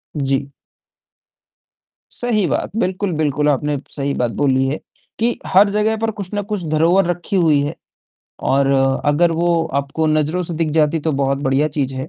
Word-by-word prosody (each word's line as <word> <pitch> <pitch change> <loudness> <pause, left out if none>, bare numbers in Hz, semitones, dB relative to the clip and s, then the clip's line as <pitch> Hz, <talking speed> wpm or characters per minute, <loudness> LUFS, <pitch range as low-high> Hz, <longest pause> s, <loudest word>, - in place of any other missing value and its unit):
जी। 135 -1 -1 1.6
सही 225 -5 0
बात। - - -2
बिल्कुल, 190 -2 -1
बिल्कुल, 150 -1 +1
आपने 145 +1 0
सही 140 -1 -1
बात 120 -3 -1
बोली 135 -2 +2
है 140 +3 -2 0.4
कि 235 +2 +1
हर 200 +2 +5
जगह 210 +2 +1
पर 225 0 -1
कुछ 195 -2 -5
न 205 - 0
कुछ 205 -4 -1
धरोहर 170 +5 +3
रखी 175 +3 -3
हुई 160 -6 +4
है 145 - -3 0.8
और 135 +1 +3 0.4
अगर 150 +4 +3
वो 170 0 +1 0.2
आपको 145 +3 -2
नज़रों 155 +3 +1
से 170 -1 -4
दिख 160 -1 0
जाती 155 +1 +2
तो 160 +1 -1
बहुत 135 0 +1
बढ़िया 135 +3 +2
चीज़ 135 -2 -1
है 130 0 -5
155 Hz, 170 wpm, -19 LUFS, 140-180 Hz, 1.6 s, हर